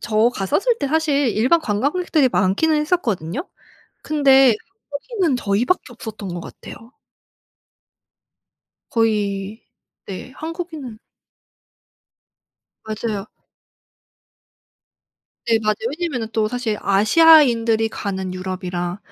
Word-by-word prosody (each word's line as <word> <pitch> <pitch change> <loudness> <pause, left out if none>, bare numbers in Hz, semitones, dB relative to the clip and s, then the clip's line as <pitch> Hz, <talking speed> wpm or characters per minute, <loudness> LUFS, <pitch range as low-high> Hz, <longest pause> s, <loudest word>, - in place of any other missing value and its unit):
저 220 +2 +2
갔었을 385 - 0
때 280 - -1
사실 290 -3 +1
일반 255 +10 +2
관광객들이 285 - +1
많기는 210 +12 +2
했었거든요. 280 - -2 0.6
근데 270 -5 +5 0.4
한국인은 340 - -1
저희 205 +1 0
밖에 365 - +1
없었던 215 -4 -8
것 - - -4
같아요. 230 +7 -12 2.0
거의 210 -2 -1 0.4
네. 195 +6 -8
한국인은 315 -8 -7 1.9
맞아요. 215 -2 -4 2.2
네 225 -1 +4
맞아요. 215 0 +1 0.2
왜냐하면은 260 -11 -3
또 220 -1 +1
사실 230 -2 -2
아시아인들이 230 0 +5
가는 190 -4 -4
유럽이랑 185 -1 -4
230 Hz, 230 characters per minute, -20 LUFS, 205-295 Hz, 2.2 s, 근데